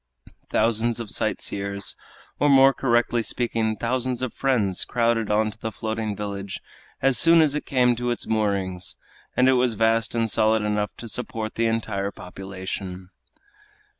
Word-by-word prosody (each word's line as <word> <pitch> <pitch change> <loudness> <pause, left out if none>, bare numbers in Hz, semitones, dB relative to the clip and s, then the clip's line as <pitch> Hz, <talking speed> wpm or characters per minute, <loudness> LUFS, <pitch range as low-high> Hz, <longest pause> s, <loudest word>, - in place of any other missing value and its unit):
Thousands 115 +1 +1
of 115 -3 -3
sight - - 0
seers 100 -1 -2 0.4
or 145 - +3
more 135 0 +7
correctly 120 -2 +1
speaking, 115 -1 -1
thousands 125 +2 -2
of 130 - -3
friends 110 -9 +1
crowded 115 -2 0
on 110 +1 +2
to 110 - -18
the 110 - -4
floating 110 0 -3
village 100 -1 -5 0.4
as 135 -2 +4
soon 165 0 +6
as 155 -3 +4
it 150 - -4
came 125 -3 +3
to 120 0 -2
its 120 - -2
moorings, 100 -5 -1 0.4
and 125 - +5
it 130 - +6
was 125 -3 +1
vast 115 +2 +1
and 115 -1 +1
solid 110 0 +2
enough 105 0 -1
to 120 - -8
support 110 -1 -4
the 115 0 +1
entire 110 -3 -1
population. 95 -1 -7
110 Hz, 160 wpm, -24 LUFS, 100-120 Hz, 0.4 s, more